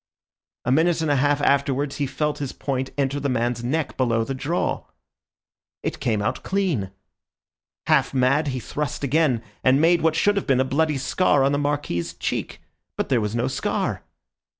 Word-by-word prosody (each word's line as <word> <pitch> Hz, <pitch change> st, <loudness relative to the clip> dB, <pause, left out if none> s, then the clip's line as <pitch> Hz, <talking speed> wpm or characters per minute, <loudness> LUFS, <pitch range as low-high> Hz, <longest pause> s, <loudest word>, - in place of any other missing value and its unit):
A 125 Hz, -, +1 dB
minute 160 Hz, +4 st, +3 dB
and 160 Hz, -2 st, +1 dB
a -, -, +3 dB
half 145 Hz, +1 st, +2 dB
afterwards 140 Hz, 0 st, +1 dB
he 145 Hz, -, -1 dB
felt 150 Hz, +2 st, -2 dB
his 140 Hz, -3 st, -4 dB
point 130 Hz, -1 st, -3 dB
enter 140 Hz, 0 st, 0 dB
the 140 Hz, 0 st, -1 dB
man's 120 Hz, -1 st, -1 dB
neck 150 Hz, +5 st, -2 dB
below 115 Hz, -3 st, +2 dB
the 135 Hz, -, -3 dB
jaw. 150 Hz, +6 st, -1 dB, 1.0 s
It -, -, -3 dB
came 110 Hz, -3 st, 0 dB
out -, -, -1 dB
clean. 180 Hz, -, -1 dB, 1.0 s
Half -, -, +3 dB
mad, 140 Hz, +3 st, +2 dB
he 130 Hz, -2 st, -2 dB
thrust 145 Hz, +4 st, -4 dB
again, 140 Hz, -4 st, +2 dB, 0.2 s
and 130 Hz, +1 st, +4 dB
made 170 Hz, +2 st, +4 dB
what 160 Hz, -1 st, +2 dB
should 205 Hz, +4 st, +2 dB
have 200 Hz, -, -2 dB
been 135 Hz, -2 st, +3 dB
a 130 Hz, -, +3 dB
bloody 150 Hz, +2 st, +1 dB
scar 140 Hz, +2 st, +2 dB
on 135 Hz, -, +3 dB
the 145 Hz, -, +1 dB
Marquis's 145 Hz, -12 st, -2 dB
cheek. -, -, -3 dB, 0.4 s
But -, -, -2 dB
there 125 Hz, -4 st, +2 dB
was 105 Hz, +1 st, -2 dB
no 120 Hz, +2 st, 0 dB
scar. 130 Hz, -, -2 dB
140 Hz, 180 wpm, -23 LUFS, 125-150 Hz, 1.0 s, and